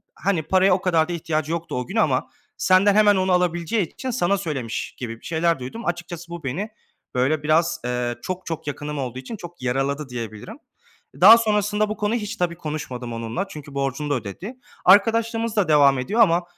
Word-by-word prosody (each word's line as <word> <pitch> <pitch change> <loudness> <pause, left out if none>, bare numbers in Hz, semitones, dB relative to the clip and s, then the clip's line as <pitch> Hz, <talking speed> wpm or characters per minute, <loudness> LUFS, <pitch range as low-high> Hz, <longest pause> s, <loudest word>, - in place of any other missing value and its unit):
hani, 175 -4 0
"Paraya 190 +3 +3
o 185 - +1
kadar 165 -4 +2
da - - -2
ihtiyacı 160 -2 -2
yoktu 170 0 -3
o 125 - -4
gün - - -7
ama - - +1 0.3
senden 195 +2 +4
hemen 210 -1 +6
onu 185 0 +1
alabileceği 180 +2 0
için 260 - -4
sana 200 -5 +1
söylemiş," 140 - -4
gibi 115 -2 -6
bir - - -19
şeyler 165 -2 +1
duydum. 130 - -7
Açıkçası 175 -1 -4
bu 170 -1 -7
beni, 175 +12 -3 0.5
böyle, 145 +4 +1
biraz, 155 +2 +2
ııı, 125 -1 -1
çok, 185 0 -5
çok 165 -2 -5
yakınım 145 0 -4
olduğu 130 -1 -4
için 135 - -7
çok 175 -3 -11
yaraladı 135 +3 -1
diyebilirim. 115 -4 -7 0.6
Daha 220 +5 +10
sonrasında 210 -1 +1
bu 215 - -4
konu 210 +2 0
hiç 220 -1 -3
tabii 175 -1 -1
konuşmadım 130 -7 -5
onunla. 115 - -3
Çünkü 150 -5 -10
borcunu 140 +2 -2
da - - +2
ödedi. 130 - -6 0.3
Arkadaşlığımız 225 +3 +4
da 205 -5 +2
devam 140 -3 +5
ediyor 215 - +1
ama 175 -4 +4
170 Hz, 190 wpm, -23 LUFS, 140-200 Hz, 0.6 s, Daha